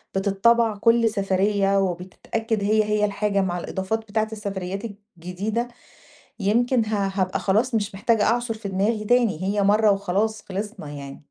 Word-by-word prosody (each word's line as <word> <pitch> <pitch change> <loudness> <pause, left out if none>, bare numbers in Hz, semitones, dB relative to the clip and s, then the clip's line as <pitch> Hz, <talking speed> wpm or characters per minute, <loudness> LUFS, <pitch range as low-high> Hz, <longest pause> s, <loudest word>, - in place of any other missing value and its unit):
بِتِتْطبع 215 +3 +3
كُلّ 230 +1 +4
سفرية 195 -1 +1
وبتتأكد 195 +4 -2
هي 215 +1 +3
هي 210 0 +1
الحاجة 200 -1 0
مع 180 -2 -1
الإضافات 190 +5 -2
بتاعة 220 0 -2
السفريات 195 -2 -4 0.4
الجديدة، 205 +8 -3 0.7
يمكن 230 +3 +2
ه 205 -2 0
هابقى 185 -2 0
خلاص 220 +5 +1
مش 205 -3 -1
محتاجة 215 +2 +2
أعْصُر 235 +1 +1
في 215 -2 -7
دماغي 210 +3 0
تاني، 230 -7 +2
هي 200 +1 +1
مَرّة 210 +1 +4
وخلاص 200 +2 0
خلِصْنا 200 -4 -6
يعني. 140 -1 -8
205 Hz, 145 wpm, -23 LUFS, 195-220 Hz, 0.7 s, كُلّ